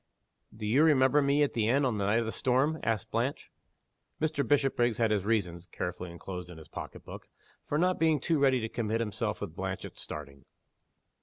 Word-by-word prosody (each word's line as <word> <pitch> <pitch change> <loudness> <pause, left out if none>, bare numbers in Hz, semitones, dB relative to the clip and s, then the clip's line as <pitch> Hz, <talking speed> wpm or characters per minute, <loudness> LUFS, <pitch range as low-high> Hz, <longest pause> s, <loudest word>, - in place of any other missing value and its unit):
"Do 110 -1 -7
you 125 +8 +4
remember 145 -2 +5
me 140 +1 +3
at 145 - 0
the 110 -2 +1
inn 135 +3 +3
on 115 -5 0
the 100 - 0
night 110 +3 +3
of - - -2
the 110 - -2
storm?" 135 +7 +1
asked 110 -1 -1
Blanche. 120 +5 -2 0.7
Mr. 155 -2 0
Bishopriggs 125 -4 +2
had 115 -2 +2
his 100 -2 +1
reasons 90 -6 -1
(carefully 90 0 -5
inclosed 90 +1 -7
in 90 - -10
his 80 -1 -12
pocketbook) - - -9 0.4
for 145 - 0
not 180 +3 +2
being 160 -2 +3
too 160 +3 +1
ready 135 -2 +4
to 110 - -2
commit 115 -1 -2
himself 110 -3 -2
with - - -5
Blanche - - -4
at - - -11
starting. 70 -1 -8
115 Hz, 200 wpm, -30 LUFS, 105-140 Hz, 0.7 s, remember